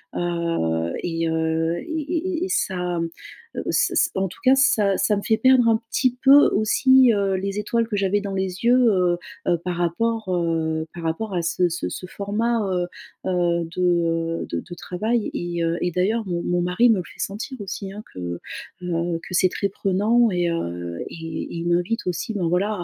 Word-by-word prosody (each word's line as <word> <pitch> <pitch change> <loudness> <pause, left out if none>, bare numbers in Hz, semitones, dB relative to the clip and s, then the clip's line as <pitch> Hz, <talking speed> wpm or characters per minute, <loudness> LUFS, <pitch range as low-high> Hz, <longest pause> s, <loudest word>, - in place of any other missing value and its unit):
heu 165 - -1
et 165 -1 -1
heu 160 +1 0
et - - -8
et 320 +2 -3 0.2
et - - +1
et - - -6
ça, 180 - -1 0.6
heu, - - -2
ç - - +2
ç - - +3
en 190 0 +1
tout - - -13
cas 260 0 +6
ça 215 -7 +3
ça 210 - +2
me - - -2
fait 220 - +3
perdre 255 0 +5
un 225 - +4
petit 250 -1 +1
peu 280 +2 +8
aussi, 260 +3 +5
heu, 200 -2 +1
les 195 +2 -2
étoiles 230 +2 0
que 210 - -2
j'avais 200 +1 +1
dans 200 -1 -4
les 190 +3 -3
yeux, 245 - +6 0.2
heu, 180 -3 +2 0.3
heu 175 - +3
par 180 - -1
rapport, 215 +5 -1
heu, 165 -3 0
par 170 -1 -8
rapport 190 +6 -2
à 175 - +1
ce 180 +2 +1
ce 170 - -3
ce - - -6
format, 220 +5 -1
heu, 180 -1 0 0.4
heu, 175 -2 +1
de, 180 - -2
heu, 165 -1 +1
de - - -2
de 175 - -10
travail. 215 +6 -2
Et 175 0 -3
heu 165 +1 0
et 180 - 0
d'ailleurs 210 +6 0
mon 175 -1 -2
mon 175 0 0
mari 180 +7 +3
me 225 - +5
le 180 - -2
fait - - -15
sentir 220 +7 -4
aussi, 195 0 -5
hein, 210 - -7
que, 85 -1 -5 0.4
heu, 170 -1 -1
que - - -13
c'est 185 +1 +4
très 200 - -1
prenant 210 +5 +2
et 175 -1 +1
heu 85 - -4
et - - -9 0.3
et - - -7
il 170 +1 -3
m'invite 175 +5 0
aussi, 180 +5 -2
ben, 185 -5 -1
voilà 180 +4 +1
180 Hz, 205 wpm, -23 LUFS, 170-220 Hz, 0.6 s, peu